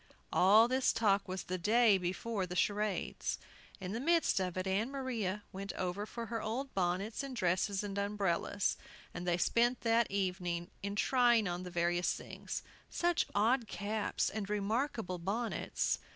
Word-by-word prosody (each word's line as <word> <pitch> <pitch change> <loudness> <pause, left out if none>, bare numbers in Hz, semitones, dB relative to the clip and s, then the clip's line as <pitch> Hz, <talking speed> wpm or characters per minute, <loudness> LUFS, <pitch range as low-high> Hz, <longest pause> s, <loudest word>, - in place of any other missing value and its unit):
All 210 +5 +6
this 260 +1 +2
talk 200 -3 +2
was 185 0 -4
the 185 0 -3
day 215 +1 +4
before 185 +3 -2
the 180 - -5
charades. 205 +1 0 0.4
In 185 -2 -5
the 225 - -2
midst 330 -3 +3
of 185 -1 -2
it 185 - -1
Ann 200 +5 0
Maria 230 -8 -2
went 195 0 -5
over 185 +3 -3
for 235 +1 -5
her 230 0 -3
old 260 +5 -3
bonnets 190 +5 -1
and 275 -2 -6
dresses 190 0 +1
and 200 -1 -4
umbrellas, 200 -1 0 0.4
and 180 0 -5
they 175 -1 +2
spent 240 +6 +2
the 230 0 +3
evening 180 -3 -2
in 200 +1 -3
trying 240 -2 +4
on 175 0 -2
the 180 - -6
various 175 0 +1
things, - - -6 0.3
such 345 -1 +1
odd 230 +3 +3
caps 205 +1 -1
and 205 -2 -4
remarkable 210 - -1
bonnets! 215 +7 -1
205 Hz, 160 wpm, -34 LUFS, 185-230 Hz, 0.4 s, All